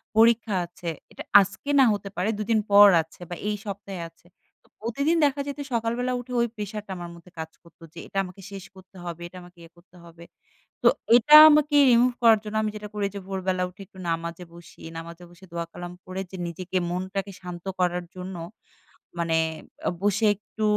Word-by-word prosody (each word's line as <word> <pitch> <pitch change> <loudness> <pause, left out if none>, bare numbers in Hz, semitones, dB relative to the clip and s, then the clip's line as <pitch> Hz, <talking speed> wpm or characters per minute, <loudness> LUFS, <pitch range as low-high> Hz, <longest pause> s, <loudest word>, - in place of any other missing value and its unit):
পরীক্ষা 225 -2 +4
আছে। 175 0 -11 0.2
এইটা - - -9 0.2
আজকে 200 +8 -5
না 265 - +7
হতে 200 -1 -5
পারে 185 +4 0
দুদিন 215 +1 +1
পর 205 0 +9
আছে 160 0 -16
বা 175 - -4
এই 210 - 0
সপ্তাহে 195 -2 -6
আছে। 165 +1 -28 0.4
তো - - -28
প্রতিদিন 280 +9 0
দেখা 285 0 0
যেত 285 +1 -5
সকালবেলা 235 +2 -1
উঠে 245 +1 -10
ওই 235 - +2
pressure 210 0 -5
টা - - -8
আমার 175 -1 -7
মধ্যে 170 +1 -17
কাজ 160 0 -5
করতো 170 -1 -19
যে, - - -17
"এইটা - - -8
আমাকে 185 +2 -12
শেষ 195 -2 -8
করতে 190 0 -17
হবে, 170 0 -6
এইটা 185 +1 -13
আমাকে 175 0 -17
ইয়ে 165 0 -14
করতে 175 +1 -23
হবে।" 170 0 -14 0.6
তো - - +6 0.3
এইটা 245 +5 +4 0.2
আমাকে 300 0 +3 0.2
remove 245 +1 +4
করার 225 -2 +6
জন্য 215 0 -6
আমি 215 - 0
যেটা 210 0 -7
করি 205 -1 -1
যে - - -4
ভোরবেলা 190 -1 -1
উঠে 185 +3 -15
একটু 190 -2 -16
নামাজে 170 +1 -3
বসি। 170 -1 -15 0.2
নামাজে 170 +1 -9
বসে 175 +2 -16
দোয়া-কালাম 170 +1 -6
পড়ে 185 +1 -5
যে 190 - -7
নিজেকে 180 +2 -4
মনটাকে 190 +2 -3
শান্ত 180 -1 -8
করার 180 0 +1
জন্য 185 0 -7 0.8
মানে 165 -1 +1 0.5
আ - - +4
বসে 205 +2 +1
একটু 215 +2 -8
190 Hz, 195 wpm, -25 LUFS, 175-215 Hz, 0.8 s, পর